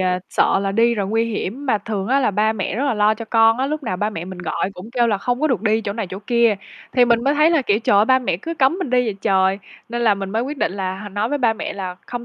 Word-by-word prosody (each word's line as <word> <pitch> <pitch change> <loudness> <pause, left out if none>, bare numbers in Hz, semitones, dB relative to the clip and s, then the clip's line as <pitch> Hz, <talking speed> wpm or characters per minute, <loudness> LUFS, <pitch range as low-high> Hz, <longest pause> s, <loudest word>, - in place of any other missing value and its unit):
à, 180 -1 +1
sợ - - +2
là 195 0 -2
đi 235 +3 +3
rồi 200 -3 -2
nguy 225 +3 +1
hiểm, 230 +4 -4
mà 215 -5 +2
thường 200 -3 -4
á 270 +2 +3
là 250 - +2
ba 215 +2 +1
mẹ 195 -3 -3
rất 255 +6 -1
là 275 -5 +1
lo 210 +1 +3
cho 230 - -7
con 225 +1 +3
á, 265 - 0
lúc 305 +2 -3
nào 205 -8 -3
ba 210 +3 -1
mẹ 165 -4 -6
mình 185 0 -9
gọi 180 +2 -2
cũng 185 +5 -10
kêu 240 -1 +2
là 210 -4 0
"Không 245 +5 -2
có 310 - +2
được 245 - 0
đi 220 0 +2
chỗ 200 -2 -4
này, 225 -2 -4
chỗ 185 +2 -7
kia." 235 -3 +3 0.4
Thì 250 -1 +5
mình 235 -1 +2
mới 280 +2 +2
thấy 305 +2 +4
là, 320 -5 +2
kiểu, 210 -2 +1
trời 215 -3 +2
ơi, 205 - +5
ba 260 +3 +4
mẹ 245 -9 -1
cứ 330 - -6
cấm 300 +4 +2
mình 330 -9 -3
đi 250 0 +3
vậy 220 -4 -2
trời, 190 0 +2 0.3
nên 240 +1 -3
là 220 -3 +4
mình 195 -1 -5
mới 225 +3 0
quyết 280 +3 -5
định - - 0
là 190 -1 -3
h 205 +1 -7
nói 205 +3 -1
với 290 - -1
ba 235 -4 +3
mẹ 220 - -5
là 185 -2 -6
"Không 245 -1 -6
225 Hz, 325 wpm, -20 LUFS, 200-250 Hz, 0.4 s, Thì